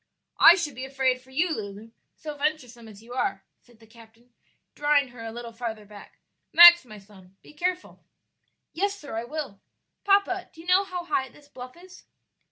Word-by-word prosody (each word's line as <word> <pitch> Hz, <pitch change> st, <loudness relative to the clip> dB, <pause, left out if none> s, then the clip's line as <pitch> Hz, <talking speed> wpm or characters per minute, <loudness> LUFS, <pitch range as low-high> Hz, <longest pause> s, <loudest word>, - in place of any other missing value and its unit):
"I 340 Hz, -, +9 dB
should 325 Hz, -6 st, -4 dB
be 255 Hz, +2 st, -8 dB
afraid 265 Hz, -1 st, -1 dB
for 260 Hz, -, -23 dB
you, 315 Hz, +6 st, -1 dB
Lulu, 210 Hz, +1 st, -9 dB, 0.2 s
so 300 Hz, -1 st, -8 dB
venturesome 270 Hz, -6 st, -4 dB
as 215 Hz, 0 st, -14 dB
you 240 Hz, +2 st, -12 dB
are," 245 Hz, -6 st, -2 dB, 0.2 s
said 240 Hz, -3 st, -24 dB
the 225 Hz, -, -19 dB
captain, 230 Hz, +1 st, -20 dB, 0.4 s
drawing 290 Hz, -2 st, +1 dB
her 240 Hz, -1 st, -12 dB
a 225 Hz, -, -6 dB
little 235 Hz, 0 st, -8 dB
farther 225 Hz, -2 st, -7 dB
back. 205 Hz, 0 st, -15 dB, 0.3 s
"Max, 345 Hz, -1 st, +9 dB
my 215 Hz, -3 st, -12 dB
son, 195 Hz, -2 st, -19 dB
be -, -, -17 dB
careful." 360 Hz, +4 st, -4 dB, 0.7 s
"Yes, 400 Hz, +4 st, -2 dB
sir, 290 Hz, -, -9 dB
I 225 Hz, +1 st, -4 dB
will. 270 Hz, -7 st, -7 dB, 0.4 s
Papa, 395 Hz, -2 st, +1 dB
do -, -, -18 dB
you -, -, -16 dB
know 370 Hz, +2 st, +3 dB
how 360 Hz, -2 st, -6 dB
high 265 Hz, -6 st, -2 dB
this 290 Hz, +3 st, -20 dB
bluff 255 Hz, 0 st, -12 dB
is?" 365 Hz, +1 st, -16 dB
260 Hz, 185 wpm, -25 LUFS, 225-330 Hz, 0.7 s, I